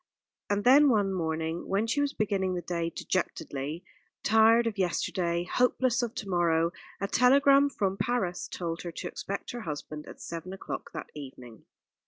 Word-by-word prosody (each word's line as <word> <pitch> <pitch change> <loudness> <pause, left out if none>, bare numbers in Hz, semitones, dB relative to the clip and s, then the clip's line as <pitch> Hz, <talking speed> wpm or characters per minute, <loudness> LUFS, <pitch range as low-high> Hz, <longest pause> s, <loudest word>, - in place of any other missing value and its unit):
And 205 0 +1
then 280 +4 +7
one 205 -5 +2
morning, 160 -1 -2
when 200 +3 +1
she 230 +6 0
was 285 -1 +1
beginning 195 -5 0
the 175 - -4
day 170 -1 -2
dejectedly, 160 -3 -3 0.4
tired 225 +2 +5
of 215 -3 -2
yesterday, 175 -1 0
hopeless 250 +5 +1
of 240 -2 -3
to 205 - -5
morrow, 170 -2 +2 0.3
a 200 - -1
telegram 275 +5 +5
from 195 -7 -1
Paris 205 -5 -1
told 170 -1 -4
her 175 - -5
to - - -5
expect 200 0 -5
her 240 - -6
husband 150 -3 -6
at - - -11
seven 170 +2 -6
o'clock 195 - -6
that - - -7
evening. 125 -5 -10
190 Hz, 165 wpm, -29 LUFS, 170-230 Hz, 0.4 s, then